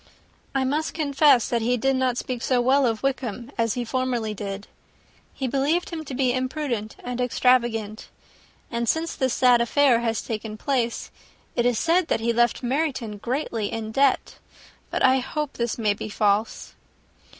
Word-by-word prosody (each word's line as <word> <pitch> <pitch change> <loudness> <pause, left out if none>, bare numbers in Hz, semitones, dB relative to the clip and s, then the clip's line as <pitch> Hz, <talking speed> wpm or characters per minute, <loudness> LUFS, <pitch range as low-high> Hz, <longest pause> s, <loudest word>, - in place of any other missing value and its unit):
"I 270 - +2
must 295 +4 -1
confess 285 -4 +4
that 235 -1 0
he 245 +2 +1
did 270 +3 +1
not 260 -2 +1
speak 250 -2 -4
so 255 -1 +1
well 260 +2 +3
of 225 +1 -2
Wickham 255 -2 -2
as 230 -2 0
he 245 -1 -2
formerly 245 -3 -1
did. 200 0 -6 0.7
He 265 - -3
believed 285 +8 0
him 325 -2 -4
to 270 - -6
be 255 -1 +2
imprudent 255 -4 -3
and 250 0 -3
extravagant; 240 -4 +1 0.6
and 235 -1 -1
since 330 +1 0
this 260 -2 0
sad 245 -2 +5
affair 250 0 +4
has 230 -1 -1
taken 215 -1 -5
place, 240 -1 -1 0.4
it 240 0 +2
is 245 -2 +1
said 335 +4 +2
that - - +1
he 235 +1 0
left 240 +2 +2
Meryton 255 -5 -1
greatly 235 -2 -2
in 220 -1 -4
debt: 275 +3 +1 0.5
but - - -1
I 260 +1 +5
hope 295 +3 -3
this 235 -1 -2
may 215 -3 +2
be 215 +1 -6
false." 210 +1 0
245 Hz, 170 wpm, -24 LUFS, 230-270 Hz, 0.7 s, sad